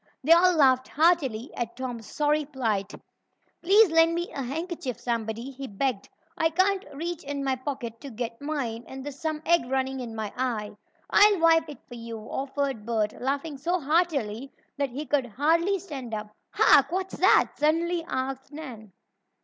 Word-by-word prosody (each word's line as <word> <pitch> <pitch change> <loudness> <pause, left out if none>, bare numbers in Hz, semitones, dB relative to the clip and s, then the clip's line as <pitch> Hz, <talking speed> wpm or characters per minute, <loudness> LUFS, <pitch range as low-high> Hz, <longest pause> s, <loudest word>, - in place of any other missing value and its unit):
They 310 - +2
all 360 +2 +7
laughed 260 -4 +4
heartily 285 -7 +2
at 235 -1 -4
Tom's 245 -4 -5
sorry 300 0 +1
plight. 225 -8 -2 0.7
"Please 395 +2 +5
lend 325 +1 +4
me 345 +1 -3
a 275 - -4
handkerchief, 275 - -4
somebody," 235 +1 -3
he 270 0 -7
begged. 210 0 -2 0.3
"I 325 0 +2
can't 375 +3 +2
reach 340 +3 -4
in 280 0 -4
my 265 -1 +1
pocket 255 -4 -6
to 280 - -7
get 230 0 -5
mine, 265 -6 -3
and 265 0 -8
there's 285 -1 -7
some 315 -2 -3
egg 335 -7 +3
running 265 0 -1
in 235 -3 -6
my 215 -2 -4
eye." 235 -5 -2 0.4
"I'll 410 -2 +6
wipe 325 -1 +4
it 295 - -10
for 245 - -11
you," 230 -1 -7
offered 270 +1 -3
Bert, 215 -2 0
laughing 280 +2 -2
so 350 +5 0
heartily 275 -6 0 0.2
that 280 -1 -1
he 280 +5 -5
could 280 -4 +1
hardly 330 - +2
stand 270 - -6
up. 210 0 -6 0.2
"Hark! 280 +2 +5
What's 375 +1 -3
that?" 375 - +5
suddenly 330 +3 +1
asked 265 +1 -4
Nan. 245 -10 -9
275 Hz, 170 wpm, -26 LUFS, 240-325 Hz, 0.7 s, all